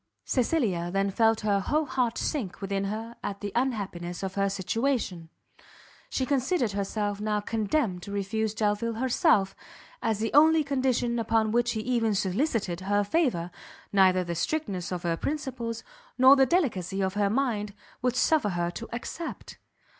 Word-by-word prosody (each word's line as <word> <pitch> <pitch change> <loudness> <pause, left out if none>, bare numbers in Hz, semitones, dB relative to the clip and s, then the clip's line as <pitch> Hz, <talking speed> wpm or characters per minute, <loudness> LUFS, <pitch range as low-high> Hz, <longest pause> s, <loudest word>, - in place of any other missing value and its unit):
Cecilia 225 - 0
then 195 +2 0
felt 225 +2 +3
her 205 -2 +2
whole 300 +10 0
heart 255 -4 0
sink 240 - -3
within 195 0 -2
her 220 +3 -5
at 200 -1 -4
the 205 -1 -4
unhappiness 200 -8 -2
of 190 -1 -3
her 200 0 +1
situation. 195 -3 -1 0.8
She 260 - -1
considered 265 - +1
herself 205 +1 -2
now 210 0 0
condemned 215 -2 -1
to 200 - -8
refuse 210 +2 -2
Delvile 215 +2 0
herself, 245 - +2 0.5
as 220 -2 0
the 220 +2 -2
only 315 +2 +6
condition 260 -4 0
upon 220 -1 +1
which 240 +1 +2
he 220 - -2
even 225 -3 +1
solicited 195 - 0
her 205 +2 +1
favour, 200 - 0 0.4
neither 185 -2 +5
the 170 -1 -4
strictness 190 - -2
of 180 -1 -3
her 170 -1 0
principles, 255 - -3 0.3
nor 260 +2 +8
the 270 -1 +4
delicacy 200 - 0
of 190 0 0
her 205 -1 +1
mind, 215 -4 -1 0.3
would 250 -1 +1
suffer 295 -6 +3
her 175 -2 -1
to 230 +6 -8
accept. 280 +7 -6
215 Hz, 155 wpm, -27 LUFS, 195-255 Hz, 0.8 s, nor